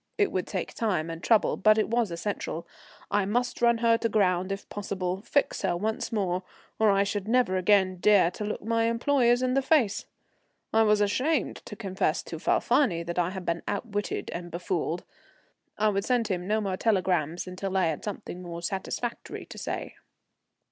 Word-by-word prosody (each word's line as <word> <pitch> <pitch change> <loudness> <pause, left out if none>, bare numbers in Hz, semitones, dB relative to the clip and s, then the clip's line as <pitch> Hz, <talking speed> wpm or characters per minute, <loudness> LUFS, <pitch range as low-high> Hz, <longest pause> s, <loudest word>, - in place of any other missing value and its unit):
It 410 - +2
would 185 - -2
take 185 -3 -4
time 180 -8 -1
and 165 0 -7
trouble, 225 -3 +3
but 215 +2 +5
it 215 - +2
was 230 -2 +1
essential. 170 -1 -4 0.5
I 205 0 +3
must 245 +5 -1
run 235 -1 +4
her 230 0 +5
to 230 - 0
ground 185 -3 +2
if 195 0 -5
possible, 190 -2 -3
fix 285 +6 0
her 185 -3 0
once 220 +5 -2
more, 185 -5 0 0.4
or 220 -1 +5
I 200 0 +4
should 205 0 -3
never 235 -5 +2
again 185 0 +3
dare 195 -2 +5
to 210 - -6
look 210 -1 -4
my 230 +1 +1
employers 240 +1 +2
in 255 0 +1
the 275 - +3
face. 265 -7 +2 0.7
I 225 - +5
was 210 -1 +4
ashamed 255 +9 +1
to 210 - -8
confess 190 -6 -1
to 165 - -7
Falfani 200 - +2
that 170 +1 -3
I 175 0 +2
had 190 -1 -6
been 170 0 -1
outwitted 205 0 -3
and 175 0 -5
befooled. 175 0 -2 0.7
I 215 +1 +3
would 200 -1 0
send 240 -2 +1
him 180 -2 -2
no 215 +1 +1
more 195 -2 -2
telegrams 180 -7 +1
until 190 +1 -3
I 185 - +3
had 160 -2 -2
something 195 -3 -6
more 170 -1 -7
satisfactory 195 +6 -4
to - - -11
say. - - -4
200 Hz, 185 wpm, -27 LUFS, 180-225 Hz, 0.7 s, but